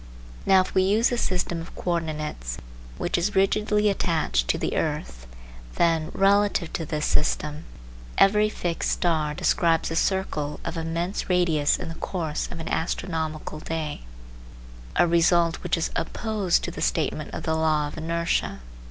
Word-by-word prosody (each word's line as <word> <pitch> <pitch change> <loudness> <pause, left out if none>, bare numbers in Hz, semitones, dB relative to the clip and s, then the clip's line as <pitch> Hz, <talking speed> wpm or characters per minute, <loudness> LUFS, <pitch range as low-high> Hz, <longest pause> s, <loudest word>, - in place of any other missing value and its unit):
Now 190 -1 +7
if 185 - -5
we 190 - +4
use 210 +6 +3
a 245 - 0
system 175 -4 -1
of 165 - -11
co 180 - -2
ordinates 155 - -3 0.4
which - - 0
is 195 +4 -1
rigidly 210 +2 +2
attached 155 - +1
to - - +2
the - - -2
earth, 60 0 -3 0.5
then, 165 -2 +2
relative 200 -3 +3
to 160 - -3
this 150 -2 -1
system, 150 +1 0 0.5
every 210 +2 +5
fixed 175 -5 -2
star 155 -4 0
describes 165 +1 +2
a - - -2
circle 165 -5 0
of 170 - -3
immense 165 +4 -2
radius 165 -5 +3
in - - -6
the 165 - -5
course 160 -5 -2
of 175 - -6
an 165 - -6
astronomical 160 -2 -2
day, 155 -1 -4 0.9
a - - +5
result 170 0 +3
which - - 0
is 165 - -1
opposed 205 0 0
to - - -3
the - - -7
statement - - -1
of - - -5
the 160 - 0
law 155 -2 +2
of 145 - -8
inertia. 165 - -1
165 Hz, 160 wpm, -25 LUFS, 155-185 Hz, 0.9 s, Now